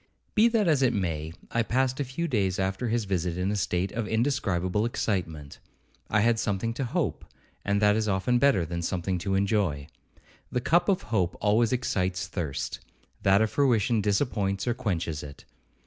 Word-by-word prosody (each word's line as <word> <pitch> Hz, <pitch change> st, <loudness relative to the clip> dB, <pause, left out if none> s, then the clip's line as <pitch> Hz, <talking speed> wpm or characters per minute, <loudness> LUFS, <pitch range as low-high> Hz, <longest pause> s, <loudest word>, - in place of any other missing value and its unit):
Be 220 Hz, +2 st, +5 dB
that 225 Hz, -4 st, +2 dB
as 150 Hz, -4 st, +3 dB
it 125 Hz, -2 st, +3 dB
may, 80 Hz, -5 st, -2 dB, 0.2 s
I 115 Hz, -, +1 dB
passed 130 Hz, +3 st, 0 dB
a -, -, +1 dB
few 140 Hz, +6 st, -3 dB
days 100 Hz, -, 0 dB
after 95 Hz, +5 st, -1 dB
his 115 Hz, -1 st, 0 dB
visit 90 Hz, -3 st, -1 dB
in 90 Hz, +2 st, 0 dB
a -, -, -1 dB
state 95 Hz, -1 st, -1 dB
of 115 Hz, -1 st, -3 dB
indescribable 105 Hz, -6 st, 0 dB
excitement. 90 Hz, -11 st, -3 dB, 0.5 s
I 110 Hz, -, +3 dB
had 115 Hz, 0 st, +3 dB
something 115 Hz, 0 st, -1 dB
to 130 Hz, +3 st, -3 dB
hope, 120 Hz, -, -2 dB, 0.4 s
and 100 Hz, 0 st, +1 dB
that 105 Hz, 0 st, +5 dB
is 110 Hz, -1 st, 0 dB
often 100 Hz, +6 st, +1 dB
better 135 Hz, -11 st, +3 dB
than 85 Hz, +1 st, -4 dB
something 90 Hz, +1 st, -2 dB
to 95 Hz, +2 st, -1 dB
enjoy. 95 Hz, -8 st, 0 dB, 0.7 s
The 125 Hz, -, 0 dB
cup 170 Hz, +8 st, +2 dB
of 190 Hz, -, +1 dB
hope 90 Hz, -5 st, +1 dB
always 110 Hz, +2 st, +2 dB
excites 95 Hz, -7 st, -1 dB
thirst, 80 Hz, -7 st, -4 dB, 0.4 s
that 100 Hz, +3 st, +4 dB
of 110 Hz, -, -1 dB
fruition 120 Hz, -5 st, +2 dB
disappoints 100 Hz, -2 st, 0 dB
or 120 Hz, -, +2 dB
quenches 85 Hz, -9 st, -2 dB
it. 70 Hz, -1 st, -11 dB
105 Hz, 180 wpm, -27 LUFS, 90-120 Hz, 0.7 s, Be